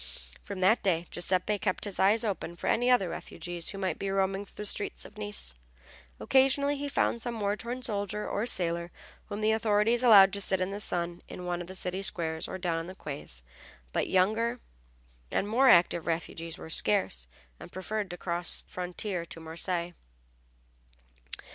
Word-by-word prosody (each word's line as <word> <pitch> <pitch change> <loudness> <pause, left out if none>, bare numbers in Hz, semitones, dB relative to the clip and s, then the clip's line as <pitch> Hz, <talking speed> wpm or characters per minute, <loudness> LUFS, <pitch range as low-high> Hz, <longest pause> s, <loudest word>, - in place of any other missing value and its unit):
From 195 -2 -7
that 200 +6 +4
day 175 -3 +1
Giuseppe 185 +4 +1
kept 185 -2 -1
his 200 -2 -5
eyes 210 +4 +4
open 190 -5 -3
for - - -8
any 245 +2 +2
other 245 -7 +4
refugees 170 0 -6
who 195 - -6
might 190 -4 -2
be 195 - -2
roaming 195 +1 0
through - - -17
the - - -7
streets 205 - -1
of - - -13
Nice. 210 - -4 0.7
Occasionally 275 +2 +3
he 285 0 -4
found 235 -4 +1
some 235 -2 -3
war 205 0 +1
worn 245 +2 -5
soldier 210 -1 -2
or 220 +4 -1
sailor 170 -5 0 0.3
whom 205 +1 -5
the 215 +1 +3
authorities 220 +1 +2
allowed 200 -6 +8
to 200 - -1
sit 190 -1 +1
in 185 +1 -1
the 200 - -4
sun 175 -4 0
in 180 - -8
one 175 0 -2
of 175 - -7
the 185 - -6
city 185 +1 -3
squares 160 -4 0
or - - -5
down 175 -3 -1
on 165 - -6
the 185 - -8
quays, 140 - -8 0.5
but - - 0
younger 220 +6 +2 0.7
and 200 - 0
more 255 +5 +4
active 170 -4 +5
refugees 165 0 -3
were 160 - -9
scarce, 110 - +2 0.3
and - - -11
preferred 205 +2 -3
to 175 - -6
cross 175 0 0
the - - -27
frontier 180 0 -3
to 165 - -9
Marseilles. 170 +2 -3
190 Hz, 185 wpm, -29 LUFS, 175-215 Hz, 0.7 s, allowed